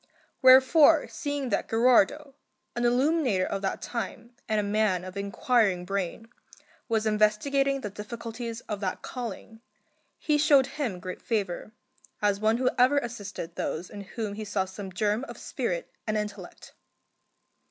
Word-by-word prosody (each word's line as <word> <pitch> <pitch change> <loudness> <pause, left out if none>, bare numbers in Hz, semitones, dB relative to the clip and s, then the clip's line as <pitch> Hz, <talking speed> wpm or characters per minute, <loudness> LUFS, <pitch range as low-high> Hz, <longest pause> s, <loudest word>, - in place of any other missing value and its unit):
Wherefore, 265 +4 +7
seeing 285 -4 -3
that 200 - -1
Gherardo, 250 +5 +3 0.4
an 240 0 0
illuminator 250 - +2
of 195 - -3
that 195 - -3
time 235 +1 -5 0.2
and 215 -1 +2
a - - 0
man 205 -3 +1
of 185 0 -8
inquiring 200 -2 +1
brain, 195 +3 -3 0.6
was 220 -1 +1
investigating 265 +6 +2
the 210 - -5
difficulties 230 +2 -6
of 210 -2 -5
that 190 -2 -3
calling, 225 -2 -7 0.6
he 300 -1 +1
showed 285 -3 +5
him 255 -9 -4
great 185 +1 -7
favour, 205 -3 -2 0.5
as 205 -1 +1
one 220 +2 +2
who 255 0 +2
ever 255 +4 +5
assisted 205 -9 -4
those 170 +3 -4
in 205 - -7
whom 205 +1 -5
he 215 +1 -5
saw 200 -2 -1
some 190 +1 -8
germ 210 +5 0
of - - -10
spirit - - -3 0.2
and 215 0 0
intellect. 205 -3 -7
220 Hz, 145 wpm, -27 LUFS, 200-255 Hz, 0.6 s, Wherefore